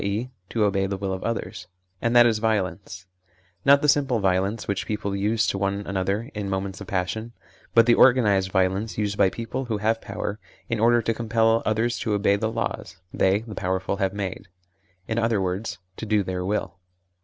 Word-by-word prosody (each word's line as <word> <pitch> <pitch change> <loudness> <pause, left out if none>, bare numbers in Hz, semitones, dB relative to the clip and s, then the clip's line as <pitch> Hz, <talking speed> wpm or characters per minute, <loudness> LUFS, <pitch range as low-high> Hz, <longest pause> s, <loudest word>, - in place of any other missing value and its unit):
e. 105 +6 -2 0.2
to 115 - 0
obey 100 -1 +1
the 100 0 -3
will 95 0 -3
of 95 - -5
others) 115 -1 -4 0.3
and 115 +1 0
that 120 0 +8
is 115 -2 +2
violence; 100 -3 -2 0.6
not 140 +1 +5
the - - +3
simple 140 -5 +3
violence 95 +3 0
which 100 - -2
people 100 -2 -2
use 105 +3 +1
to 95 - -1
one 100 +1 -1
another 100 +5 -2
in 105 -2 -4
moments 95 0 -3
of 100 - -8
passion, 100 +5 -2 0.4
but 115 -1 +7
the 120 - +5
organised 105 -8 +4
violence 95 +3 0
used 105 -2 -1
by 95 - +4
people 115 +5 -5
who 115 -3 -2
have 110 +2 0
power, 105 +1 -5 0.3
in 115 -2 -1
order 120 +1 +4
to 115 - +1
compel 115 0 +2
others 115 +2 0
to 110 - -1
obey 100 0 +3
the 110 +2 -1
laws 115 -5 -4 0.2
they 95 +2 +2
(the 110 -1 -9
powerful) 95 +1 -2
have 95 -1 0
made 100 -1 -5 0.6
in 110 0 -1
other 115 -2 +1
words, 95 +2 -2 0.2
to 110 - -6
do 105 -1 +2
their 90 -1 -3
will. 100 -1 -2
105 Hz, 195 wpm, -24 LUFS, 95-115 Hz, 0.6 s, that